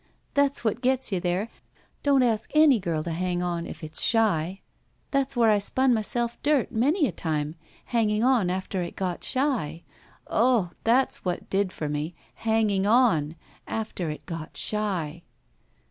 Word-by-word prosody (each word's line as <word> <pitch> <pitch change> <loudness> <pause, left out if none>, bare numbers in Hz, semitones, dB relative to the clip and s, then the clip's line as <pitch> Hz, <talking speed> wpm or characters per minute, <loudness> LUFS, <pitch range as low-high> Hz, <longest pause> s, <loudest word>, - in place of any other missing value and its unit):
That's 280 -2 +2
what 225 +1 0
gets 260 -1 +1
you 190 - +1
there. 180 +4 -1 0.5
Don't 275 -2 +4
ask 225 -3 0
any 305 -6 +6
girl 165 -4 -2
to 170 - -4
hang 175 +1 -1
on 170 -1 -2
if - - -9
it's 155 0 -3
shy. 195 -5 +2 0.5
That's 275 -2 0
where 230 -2 +5
I 210 - +4
spun 260 +5 +2
my 220 - +1
self 235 +2 -2
dirt 290 -4 +2
many 290 - +2
a 235 - -1
time, 155 -3 -2 0.3
hanging 220 -2 +1
on 245 -8 +3
after 185 +1 -2
it 170 - -5
got 185 -2 -3
shy. 245 - -1 0.4
Ugh! 225 -7 +2
That's 250 +4 +2
what 180 -2 -3
did 195 -1 +1
for 155 - -4
me 150 +3 -3
— - - -22
Changing 215 -3 +2
on 210 - +3 0.2
— - - -31
^after 210 -7 -3
it 150 - -9
got 165 -3 -7
shy." 180 -7 -2
210 Hz, 170 wpm, -26 LUFS, 175-245 Hz, 0.5 s, any